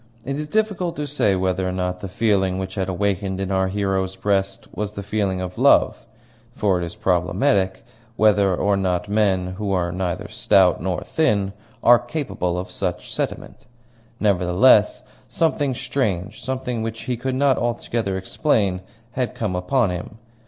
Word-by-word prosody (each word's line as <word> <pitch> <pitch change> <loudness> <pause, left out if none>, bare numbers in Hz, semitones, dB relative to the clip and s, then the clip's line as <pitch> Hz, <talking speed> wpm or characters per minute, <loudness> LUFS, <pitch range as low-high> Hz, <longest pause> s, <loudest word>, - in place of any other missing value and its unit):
It 140 +2 -3
is 150 - -4
difficult 200 -3 0
to 150 - -3
say 140 -9 +1
whether 95 0 0
or - - -2
not 90 0 -2
the 100 - -6
feeling 95 -2 +1
which 95 0 -4
had 95 -2 -2
awakened 95 0 -1
in 95 0 -2
our 95 0 +2
hero's 95 -1 -1
breast 100 -1 -1
was 105 0 -4
the 100 - -6
feeling 100 -2 -1
of 90 0 -6
love; - - +4 0.5
for 100 -7 +1
it - - -2
is 85 0 -5
problematical 95 +3 +1 0.3
whether 100 -4 +4
or 100 +3 +1
not 95 -1 -1
men 95 -3 +1
who 105 -2 -2
are 85 -2 0
neither 90 +2 -3
stout 95 -6 +3
nor 90 0 -2
thin 100 -11 +1 0.3
are 120 0 +7
capable 120 - -3
of 90 - -2
any - - -13
such 90 -3 -3
sentiment. - - -5 0.5
Nevertheless, 100 +3 +4 0.3
something 145 -5 0
strange, 105 -7 -2
something 125 -2 -3
which 115 0 -4
he 125 - -2
could 130 +2 -3
not 135 -1 +3
altogether 115 -4 -1
explain, 95 - 0 0.3
had 125 -1 -2
come 105 -5 -2
upon 105 +3 +1
him. 90 +5 -6
100 Hz, 165 wpm, -22 LUFS, 95-115 Hz, 0.5 s, are